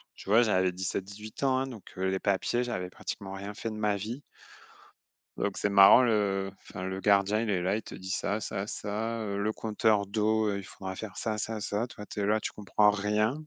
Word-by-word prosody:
tu - - -11
vois, 115 +4 +6
j'avais 95 -4 +2
17-18 100 +5 -5
ans, 130 -1 +3
hein, 135 - -1
donc 115 -6 -9
heu, 95 0 0
les 95 0 0
papiers, 100 +5 +1
j'avais 95 -7 -3
pratiquement 95 +1 -6
rien 100 +1 -6
fait 115 +2 -4
de - - -6
ma 105 -1 +1
vie. 115 +7 -5 1.2
Donc 100 -1 -1
c'est 105 - 0
marrant 100 +4 +8
le 100 -5 +1
enfin 90 - -8
le 95 +1 -3
gardien, 100 +1 +3
il 115 - -2
est 95 -3 +1
là, 90 +3 +1
il 110 - -2
te - - -10
dit: 95 - -8
«Ça, 100 +2 -1
ça, 100 -1 -4
ça, 110 +3 -3
heu, 100 -2 -3
le 105 +2 0
compteur 110 -1 +1
d'eau, 110 +1 +1
heu, 100 -1 0
il - - -8
faudra 95 +1 -7
faire 105 0 -7
ça, 110 -1 -2
ça, 110 +1 -3
ça». 105 +3 -1
Toi, 105 -4 -10
tu 105 - -5
es - - +1
là, 105 +2 +3
tu - - -4
comprends 105 0 +3
rien. 105 +3 +1
105 Hz, 225 wpm, -29 LUFS, 95-110 Hz, 1.2 s, marrant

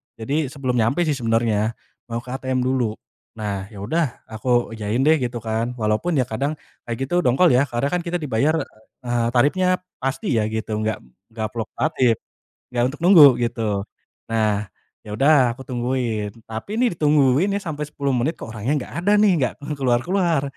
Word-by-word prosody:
jadi 140 +6 -1
sebelum 130 -2 -2
nyampe 120 +10 +2
sih 155 - 0
sebenarnya 115 -1 +1 0.3
mau 115 +1 -4
ke 125 - -9
ATM 130 -1 -1
dulu, 125 -4 0 0.4
nah 100 -3 -4
ya 100 -2 -9
udah 155 +3 -1
aku 120 +2 0
iyain 110 +3 -1
deh 155 0 +4
gitu 120 -2 -3
kan, 115 +2 -2
walaupun 110 +9 0
ya 130 - +3
kadang 135 +6 -2 0.3
kayak 120 - -2
gitu 175 +5 +1
dongkol 170 +4 +4
ya, 130 +3 +3
karena 120 +4 0
kan 180 - +1
kita 170 - -2
dibayar, 140 +4 +1 0.5
eee, 120 -1 +1
tarifnya 150 +9 +3 0.3
pasti 135 +1 -1
ya 105 - 0
gitu, 110 -1 -3
gak 110 0 -1 0.4
gak 110 -1 -2
fluktuatif, 125 +2 0 0.6
gak 120 -1 +1
untuk - - -12
nunggu 175 -3 +8 0.2
gitu. 110 -4 -2 0.5
Nah, 105 -2 +1 0.4
ya 105 - -8
udah 135 0 +4
aku 130 - -10
tungguin, 120 -4 -2 0.2
tapi 200 - -4
nih 240 -9 +1
ditungguin 150 +4 +3
nih 200 - -1
sampai 150 -5 -4
10 140 -1 -4
menit 145 +8 -1
kok - - -7
orangnya 110 +7 -1 0.2
gak - - -13
ada 205 - +4
nih, 210 -2 +5
gak - - -1
kelu 145 +1 -5
keluar-keluar, 145 +6 +1
125 Hz, 175 wpm, -22 LUFS, 115-150 Hz, 0.6 s, nunggu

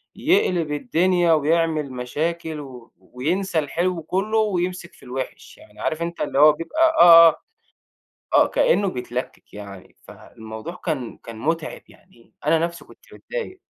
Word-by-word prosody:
يقلِب 180 - +1
الدنيا 175 0 +2
وبيعمل 155 -2 +1
مشاكل 160 +5 -3
و 125 -4 -11
وينسى 165 +7 -2
الحلو 170 +4 -2
كُلّه 200 +6 -1
ويمسِك 185 -4 -1
في - - -20
الوِحش. 130 +1 -7
يعني - - -19
عارف 155 +1 -2
أنت 170 0 -4
اللي 140 - -1
هو 155 +1 +8
بيبقى 165 - -4 0.2
آه، 170 -1 +10
آه، - - -3 1.0
آه. - - +6
كإنّه 205 - +2
بيتلكِّك 125 -5 -6
يعني، 100 -2 -11
فالموضوع 110 +9 -10
كان 135 -8 -3
كان 115 -1 -11
مُتعب 160 +5 -3
يعني 120 -11 -23
أنا 165 +1 +4
نَفْسي 170 +1 -3
كنت - - -20
متضايق. 470 -7 -7
165 Hz, 140 wpm, -22 LUFS, 135-180 Hz, 1.0 s, آه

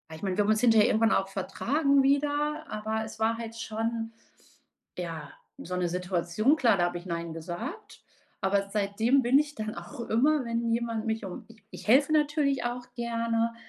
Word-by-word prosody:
ich 160 - -12
meine, 190 0 -1
wir 205 - +4
haben 215 - +3
uns 215 +1 +2
hinter 225 -3 +6
irgendwann 225 +1 +3
auch 195 - +1
vertragen 275 - +1
wieder, 295 +2 +1
aber 220 +1 -2
es 220 - -10
war 225 +1 +1
halt 230 -1 -7
schon, 225 0 -3 0.9
ja, 165 -4 -5 0.3
so 180 +1 -5
'ne 180 -1 0
Situation 180 - +1
klar, 230 -8 +4
da 175 - +3
habe 175 0 -3
ich 175 - -13
Nein 170 -1 -4
gesagt. 175 - -7 0.4
Aber 200 +1 +1
seitdem 215 +6 +2
bin 255 +3 +5
ich 290 0 -1
dann 215 0 -4
auch 290 - -9
immer, 275 +6 +2
wenn 230 0 -1
jemand 230 -1 -1
mich 220 -2 -2
um 185 - -7
ich 225 -2 -18
ich - - -10
helfe 280 +6 +5
natürlich 295 -3 +2
auch 245 0 -3
gerne, 230 -1 -1
225 Hz, 185 wpm, -28 LUFS, 200-250 Hz, 0.9 s, hinter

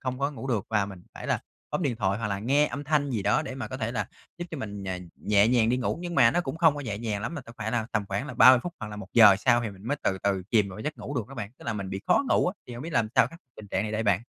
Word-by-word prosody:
không 130 -1 -3
có 140 +1 0
ngủ 135 -2 -7
được, 115 -7 -1
và 105 -3 +2
mình 95 -3 -10
phải - - -8
là - - +1 0.3
bấm - - -1
điện 135 -7 0
thoại 100 -2 0
hoặc 115 - -2
là 100 -1 -2
nghe 140 +8 +3
âm 145 0 -5
thanh 145 -1 +1
gì 110 -5 -1
đó, 150 - +2
để 130 - -6
mà 130 - -5
có 130 - -5
thể 115 -2 -3
là 125 - -2 0.3
giúp 175 - -3
cho 160 - -5
mình, 100 -5 -6
ờ, 95 -1 -3 0.2
nhẹ 105 +1 +3
nhàng 120 -2 +3
đi 125 - +2
ngủ. 130 +5 -1
Nhưng 175 -1 -5
mà 125 -7 +6
nó 175 - +1
cũng 145 -3 -4
không 165 -3 +4
có 145 - -5
nhẹ 115 -7 -4
nhàng 110 -3 -2
lắm 155 - -3
mà 155 - -4
cần 115 -3 -13
phải 110 0 -2
là 115 -2 -1
tầm 105 -2 0
khoảng 100 +7 -2
là - - -7
30 125 +2 +8
phút 175 - -5
hoặc 110 - -5
là 105 - -7
1 100 -2 -8
giờ 105 -4 +8
sau 120 +4 +3
thì 110 - -3
mình 95 -1 -14
mới 145 - 0
từ 95 - 0
từ 100 -2 +1
chìm 105 -4 +3
vào 95 - -9
cái - - -6
giấc 150 +1 -4
ngủ 145 - -6
được 115 -6 -3
đó 135 - -10
bạn, 105 -5 -5
tức - - -14
là 120 - -1
mình 100 -3 -5
bị 95 - -4
khó - - +4
ngủ - - +3
á. 180 - 0
Thì 125 - -8
hông 120 - -7
biết 165 - -6
làm 115 -5 +2
sao - - +6
khắc 165 +6 -12 0.2
tình 105 - -11
trạng 95 - 0
này 105 0 -4
đây 110 +1 0
bạn? 100 -2 +2
115 Hz, 355 wpm, -27 LUFS, 105-135 Hz, 0.3 s, 30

